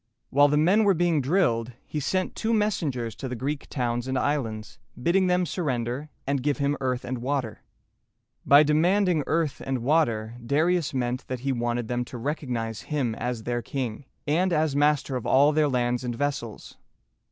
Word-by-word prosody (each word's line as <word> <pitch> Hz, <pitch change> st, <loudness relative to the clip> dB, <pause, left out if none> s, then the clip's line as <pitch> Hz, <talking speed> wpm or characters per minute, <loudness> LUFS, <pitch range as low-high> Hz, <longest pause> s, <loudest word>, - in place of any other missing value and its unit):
While 145 Hz, +2 st, +6 dB
the 145 Hz, +1 st, +2 dB
men 185 Hz, +8 st, +4 dB
were 200 Hz, -2 st, +4 dB
being 170 Hz, -3 st, +2 dB
drilled, 125 Hz, -7 st, +1 dB
he 150 Hz, -, -4 dB
sent 185 Hz, +6 st, -1 dB
two 225 Hz, +1 st, 0 dB
messengers 145 Hz, -, -1 dB
to 135 Hz, -, -5 dB
the 125 Hz, -, -4 dB
Greek 140 Hz, +4 st, -4 dB
towns 120 Hz, -1 st, -2 dB
and 130 Hz, 0 st, -1 dB
islands, 115 Hz, -7 st, -2 dB, 0.2 s
bidding 180 Hz, +8 st, +2 dB
them 180 Hz, 0 st, +2 dB
surrender 135 Hz, -4 st, -2 dB, 0.2 s
and 140 Hz, -1 st, 0 dB
give 145 Hz, +1 st, 0 dB
him 140 Hz, 0 st, +1 dB
earth 130 Hz, -1 st, -1 dB
and 125 Hz, 0 st, -3 dB
water. 125 Hz, -3 st, -2 dB, 0.8 s
By 145 Hz, +2 st, +7 dB
demanding 170 Hz, +2 st, +2 dB
"earth 155 Hz, -3 st, 0 dB
and 130 Hz, -3 st, -2 dB
water," 120 Hz, -6 st, +1 dB
Darius 155 Hz, +6 st, +1 dB
meant 125 Hz, 0 st, -2 dB
that 130 Hz, -2 st, -4 dB
he 135 Hz, +1 st, -1 dB
wanted 120 Hz, -1 st, -1 dB
them 125 Hz, +1 st, -1 dB
to 125 Hz, -, -8 dB
recognize 120 Hz, -5 st, -3 dB
him 140 Hz, -7 st, 0 dB
as 120 Hz, 0 st, -4 dB
their 120 Hz, +1 st, -2 dB
king, 125 Hz, +1 st, -4 dB, 0.2 s
and 175 Hz, +5 st, +1 dB
as 155 Hz, -3 st, +1 dB
master 145 Hz, -2 st, +2 dB
of 125 Hz, -, -3 dB
all 140 Hz, +3 st, +5 dB
their 155 Hz, -1 st, +2 dB
lands 125 Hz, -1 st, 0 dB
and 120 Hz, -1 st, -3 dB
vessels. 135 Hz, -4 st, -4 dB
140 Hz, 175 wpm, -26 LUFS, 120-155 Hz, 0.8 s, By